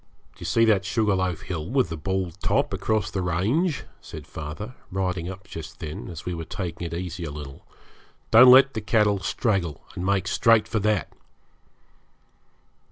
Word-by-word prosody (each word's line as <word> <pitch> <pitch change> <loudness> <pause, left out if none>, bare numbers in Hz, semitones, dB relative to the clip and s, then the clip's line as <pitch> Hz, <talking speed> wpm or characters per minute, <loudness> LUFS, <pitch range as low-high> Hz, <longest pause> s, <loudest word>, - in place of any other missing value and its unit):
'Do - - -24
you - - -7
see 115 - +4
that 105 -4 +3
sugar 105 +2 +1
loaf 95 -2 -1
hill 80 -2 -5
with 130 0 +1
the 85 - -4
bald 95 +1 -2
top, - - +1
across 110 -2 0
the 95 - -2
range?' 115 - 0 0.2
said - - -9
father, 80 +10 -7 0.2
riding 90 -2 -2
up 95 0 -9
just 80 -1 -8
then, 80 -3 -6
as 85 -3 -8
we 90 - -2
were 80 -1 -4
taking 85 0 -5
it - - -9
easy 90 0 -5
a 80 - -4
little. 70 -2 -9 0.7
'Don't 125 +3 +9
let 135 +2 +8
the 110 - -3
cattle 105 -1 +2
straggle, 95 - -1
and 90 - -5
make 95 0 +1
straight 115 -1 +4
for 110 - -1
that.' 105 -2 0
95 Hz, 175 wpm, -25 LUFS, 85-110 Hz, 0.7 s, Don't